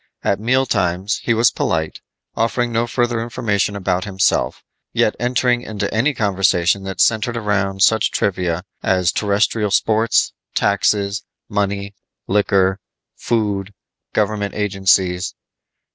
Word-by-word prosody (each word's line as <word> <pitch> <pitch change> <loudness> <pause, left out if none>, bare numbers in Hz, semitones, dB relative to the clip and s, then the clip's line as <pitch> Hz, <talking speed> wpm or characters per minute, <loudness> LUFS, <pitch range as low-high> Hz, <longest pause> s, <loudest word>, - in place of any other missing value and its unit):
At 100 - +1
meal 130 +4 +2
times 95 -2 0
he 115 - +1
was 115 +1 +4
polite, 80 -1 -2 0.3
offering 120 +1 0
no 115 +1 0
further 120 -1 0
information 110 -4 -1
about 95 -2 -1
himself, 95 -1 0 0.3
yet - - +2
entering 125 0 +1
into 105 -4 -4
any 135 +6 +1
conversation 95 -2 +2
that 95 0 -6
centered 115 +1 +2
around 100 -3 0
such 110 +1 +4
trivia 90 -3 -1 0.2
as 90 -2 +2
terrestrial 105 +1 +1
sports, 110 +3 +2 0.2
taxes, 100 0 +1 0.3
money, 100 -1 -2 0.3
liquor, 95 -1 +2 0.4
food, 105 -3 -2 0.4
government 105 -1 -1
agencies. 95 -3 +1
100 Hz, 115 wpm, -19 LUFS, 95-115 Hz, 0.4 s, was